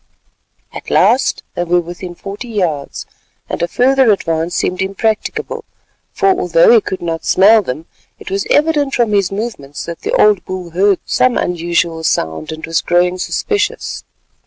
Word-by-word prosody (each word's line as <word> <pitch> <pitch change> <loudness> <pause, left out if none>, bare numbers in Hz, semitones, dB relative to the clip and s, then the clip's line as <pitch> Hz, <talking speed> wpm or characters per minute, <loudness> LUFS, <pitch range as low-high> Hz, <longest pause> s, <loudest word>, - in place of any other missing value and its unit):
At - - -8
last 260 +2 +2
they 175 - -2
were 175 +1 +2
within 175 +1 -7
forty 200 +7 -8
yards, 175 -11 -3 0.4
and - - -4
a 170 - +1
further 260 +3 +3
advance 165 -3 -1
seemed 185 - -1
impracticable; 205 +3 -2 0.5
for 390 - +1
although 475 +6 +4
he 455 - +6
could 190 - -5
not 165 -1 -3
smell 215 +4 +5
them, 155 -2 -5 0.3
it - - -10
was 195 0 -2
evident 295 -3 +2
from 235 -3 +1
his 195 -2 +2
movements 195 -10 -5
that 170 -1 -7
the - - -3
old 210 -3 +4
bull 185 -2 -6
heard 195 +3 +3
some 255 -1 +2
unusual 170 -1 -1
sound 80 - -1
and 160 0 -6
was 165 0 0
growing 180 +1 +1
suspicious. 420 - -2
190 Hz, 160 wpm, -16 LUFS, 170-235 Hz, 0.5 s, he